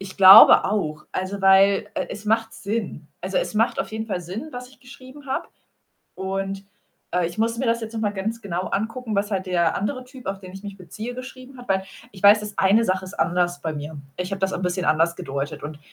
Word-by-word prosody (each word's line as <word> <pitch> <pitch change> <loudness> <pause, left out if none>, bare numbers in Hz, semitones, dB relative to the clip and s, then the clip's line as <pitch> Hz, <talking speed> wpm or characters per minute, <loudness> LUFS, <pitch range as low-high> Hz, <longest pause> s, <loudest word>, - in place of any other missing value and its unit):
ich 195 -1 -9
glaube 195 +2 +10
auch, 155 -7 -2
also, 190 +2 -3
weil, 195 +2 +5
äh, - - -2
es 210 +1 -8
macht 225 +1 +1
Sinn. 200 -7 -4
Also, 190 +1 -4
es - - -1
macht 225 +2 +1
auf - - -5
jeden 220 0 -4
Fall 185 -4 -3
Sinn, 195 - -7
was 250 0 -7
ich 265 - -21
geschrieben 265 +2 -14
habe. 265 - -3 0.7
Und, 195 +1 -4 0.5
äh, 180 -1 +1
ich 170 - -7
musste 230 +2 0
mir 260 - -1
das 230 0 +1
jetzt 225 0 -6
noch 225 - -4
mal 210 -2 0
ganz 220 +4 -3
genau 185 -3 -3
angucken, 225 +2 -3
was 205 +1 0
halt 190 -1 -1
der 175 -3 +1
andere 255 +6 -3
Typ, 250 0 -14
auf 195 0 -3
den 185 -1 -11
ich 195 +1 -10
mich 200 -1 -8
beziehe, 215 +7 -7
geschrieben 255 +1 -10
hat, 245 - -12
weil 190 0 +1 0.3
ich 190 - -14
weiß, 205 +1 +7
dass 210 -1 -8
eine 205 +4 +4
Sache 185 -1 0
ist 185 +2 -9
anders 175 0 0
bei 160 -1 -3
mir. 150 +1 -7 0.2
Ich 180 +1 -4
habe 195 - -3
das 190 0 0
'n 185 - -4
bisschen 180 0 -1
anders 165 +3 +2
gedeutet 140 +2 -5
und 150 0 -7
195 Hz, 235 wpm, -23 LUFS, 185-225 Hz, 0.7 s, glaube